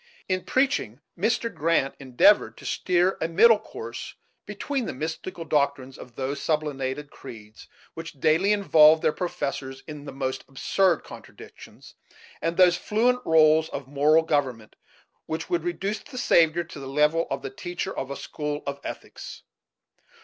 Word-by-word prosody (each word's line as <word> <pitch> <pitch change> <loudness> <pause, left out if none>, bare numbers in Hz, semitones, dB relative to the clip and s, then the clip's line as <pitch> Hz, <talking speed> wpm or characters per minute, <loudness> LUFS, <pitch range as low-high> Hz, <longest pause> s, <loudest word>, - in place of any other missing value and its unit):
In 185 -1 -1
preaching, 255 - 0 0.2
Mr. 225 +4 0
Grant 155 -3 +1
endeavored 135 +10 +3
to - - -13
steer 180 +1 +1
a 160 - +1
middle 215 +6 +5
course 440 - -8 0.3
between 275 -5 -3
the - - -5
mystical 160 +4 -5
doctrines 140 -3 0
of 120 -2 -13
those 135 +1 -3
sublimated 145 -2 -2
creeds 110 -1 -12 0.3
which 165 0 -8
daily 165 +9 +3
involve 160 -6 +5
their - - +2
professors 140 -6 -4
in 150 -2 -9
the - - -7
most 130 -1 -4
absurd 175 +6 +1
contradictions, - - -13 0.5
and 165 +1 -2
those 180 -2 +5
fluent 245 +6 +1
roles 160 0 +5
of 135 -2 -6
moral 150 +3 +3
government 135 -8 -2 0.5
which 160 0 -5
would 170 -2 0
reduce 195 +4 -2
the 255 - -12
Saviour 170 -7 +3
to 155 -4 -10
a - - -7
level 150 +4 +2
with 135 - -4
the - - -5
teacher 175 +6 -5
of 135 - -4
a 140 - -4
school 150 0 -5
of 140 0 -4
ethics. - - -8
155 Hz, 150 wpm, -25 LUFS, 140-180 Hz, 0.5 s, middle